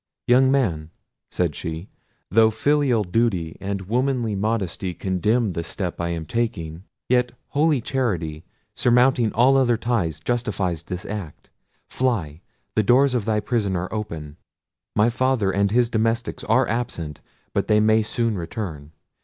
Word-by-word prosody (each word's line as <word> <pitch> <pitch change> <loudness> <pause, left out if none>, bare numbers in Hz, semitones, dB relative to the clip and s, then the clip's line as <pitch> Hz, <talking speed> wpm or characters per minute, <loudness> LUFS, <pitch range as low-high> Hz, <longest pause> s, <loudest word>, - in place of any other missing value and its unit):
"Young 130 +2 +5
man," 85 - 0 0.4
said 85 -4 0
she, 80 +5 -5 0.4
"though 110 +2 +6
filial 130 0 +2
duty 90 -5 0
and 100 0 -3
womanly 120 +2 0
modesty 95 -3 -2
condemn 100 +4 0
the 85 - -2
step 90 +1 -4
I 85 - -1
am 85 -2 -3
taking, 90 -6 -3 0.2
yet 125 0 +2 0.2
holy 150 -2 +2
charity, 90 - -2 0.3
surmounting 125 -2 +3
all 130 +4 +5
other 120 -3 +3
ties, 100 -11 -1
justifies 95 -5 -1
this 90 +2 -6
act. 100 -8 -7 0.4
Fly; 90 - -1 0.3
the 110 - +4
doors 130 +5 +4
of 120 -5 0
thy 110 -1 +1
prison 105 -5 0
are 90 +3 -3
open: 80 -9 -5 0.6
my 110 +3 +4
father 125 -5 +1
and 100 +1 +2
his 120 +3 +3
domestics 115 +1 -1
are 120 +4 +3
absent; 85 -10 -3 0.3
but - - 0
they 105 -1 +4
may 110 +1 +4
soon 115 0 0
return. 85 -5 -6
110 Hz, 145 wpm, -23 LUFS, 90-120 Hz, 0.6 s, though